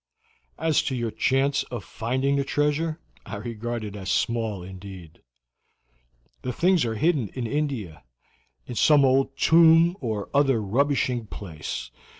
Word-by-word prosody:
As 160 -2 +2
to 135 - -1
your 120 -2 -2
chance 135 +5 +1
of 120 -5 -5
finding 130 +8 -1
the 140 - +1
treasure, 150 +3 0 0.2
I 105 - -7
regard 115 +2 -4
it 105 -1 -6
as 95 -2 -6
small 110 -5 -1
indeed. 95 -3 -11 1.2
The 125 - -3
things 175 +1 +2
are 115 -1 -2
hidden 145 -2 +1
in 125 -2 -3
India, 120 - -3 0.6
in - - -7
some 145 +3 +5
old 135 +1 +2
tomb, 165 +1 +5
or 110 -5 -3
other 135 -4 +3
rubbishing 125 +1 0
place. 80 -11 -6
125 Hz, 140 wpm, -25 LUFS, 105-145 Hz, 1.2 s, some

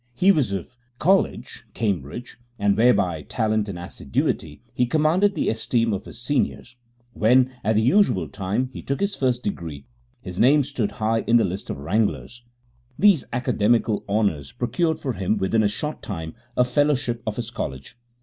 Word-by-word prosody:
He 185 +9 +5
was 145 - +1
of 100 +6 -6 0.2
College, 190 +7 +1
Cambridge, 100 - -3 0.2
and 100 0 +2
where, 120 +3 +5
by 90 -8 0
talent 110 - -1
and 95 - -5
assiduity, 85 -6 -3
he 125 - +1
commanded 165 +8 +2
the - - -1
esteem 115 0 +1
of 100 - -4
his - - -9
seniors; 125 -1 -2 0.4
when, 125 +4 +3
at 110 +2 +1
the 110 - +3
usual 125 - +3
time, 105 - -2
he - - -7
took 140 - -3
his 200 0 0
first 125 -5 0
degree, 80 -8 -5 0.3
his 90 0 -8
name 145 +4 +5
stood 130 -6 -3
high 110 +1 0
in 120 - +5
the 115 - +3
list 95 +2 -5
of - - -3
wranglers. 85 - -1 0.6
These 200 -8 +4
academical 120 -3 +1
honours 100 -10 0
procured 160 +7 -1
for 130 -3 -3
him 95 +2 -1
within 100 +3 +1
a 105 - +3
short 150 +9 -3
time 80 -6 -6 0.2
a 125 - +6
Fellowship 125 -2 +1
of 105 - -1
his 120 0 -5
College. 65 - -6
115 Hz, 170 wpm, -23 LUFS, 100-130 Hz, 0.6 s, a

